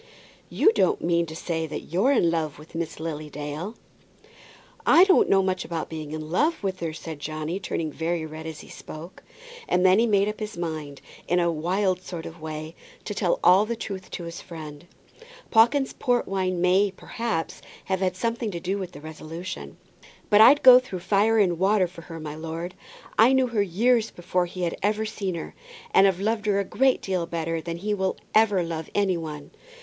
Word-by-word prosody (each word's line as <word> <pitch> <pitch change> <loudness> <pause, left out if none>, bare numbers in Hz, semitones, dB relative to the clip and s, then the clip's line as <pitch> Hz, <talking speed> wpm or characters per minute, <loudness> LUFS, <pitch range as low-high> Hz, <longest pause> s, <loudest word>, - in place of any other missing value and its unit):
"You 430 - +4
don't 420 -4 +1
mean 170 -1 +1
to 160 - -8
say 160 -1 -3
that 155 - -7
you're 200 +10 +3
in 175 -11 +3
love 160 -3 -2
with 155 +3 -15
Miss 165 -2 -4
Lily 155 -2 -5
Dale?" 150 +9 -6 1.1
"I 345 - +7
don't 385 -1 +4
know 195 -1 +4
much 185 -1 -1
about 165 -2 -4
being 155 -2 -6
in 155 0 -6
love 305 - +1
with 190 -1 -2
her," 165 -2 -3
said 155 -1 -8
Johnny, 155 +4 -4
turning 165 -4 -3
very 165 +1 -2
red 160 +1 -8
as 160 -2 -7
he - - -14
spoke. 160 +4 -10 0.5
And 180 +1 +3
then 185 +2 +6
he 235 - +3
made 200 -2 +3
up 210 - -4
his 215 -4 -5
mind, 155 -4 -5 0.3
in 180 - +2
a 170 -1 +2
wild 185 +4 0
sort 175 -3 -7
of 165 0 -10
way, 155 0 -6 0.3
to - - -3
tell - - 0
all 190 +3 +7
the 235 - -2
truth 195 -4 -6
to 175 - -6
his 170 0 -7
friend. 155 -1 -10 0.6
Pawkins's 245 +5 +4
port 245 -1 0
wine 185 -2 -1
may, 185 +3 +4
perhaps, 195 -2 -4 0.2
have 190 -1 -1
had 185 -1 0
something 230 +3 -2
to 175 -4 -5
do 190 +3 -2
with 185 -2 -6
the 145 - -10
resolution. 160 +4 -7 0.5
"But 205 +1 +7
I'd 275 +6 +7
go 255 -1 +10
through 195 -8 -7
fire 205 +4 +3
and 180 -5 +2
water 195 0 +3
for 175 -1 -10
her, 165 -1 -9
my 150 -1 -6
lord. 165 +3 -5 0.5
I 235 +4 +7
knew 265 -1 +4
her 225 -3 +1
years 225 +5 +2
before 175 0 -1
he 180 +1 -6
had 170 - -1
ever 215 +2 +1
seen 200 -4 -3
her, 165 - -6 0.4
and 195 +1 +7
have 190 -2 0
loved 215 +1 -1
her 200 -1 +3
a - - +1
great 265 +6 +2
deal 185 -3 -1
better 165 -1 -2
than 170 +1 -5
he 210 +4 -2
will 190 -2 -1 0.2
ever 210 -4 +4
love 160 -1 -5
any 200 -3 +2
one. 155 -3 -7
180 Hz, 205 wpm, -25 LUFS, 160-205 Hz, 1.1 s, go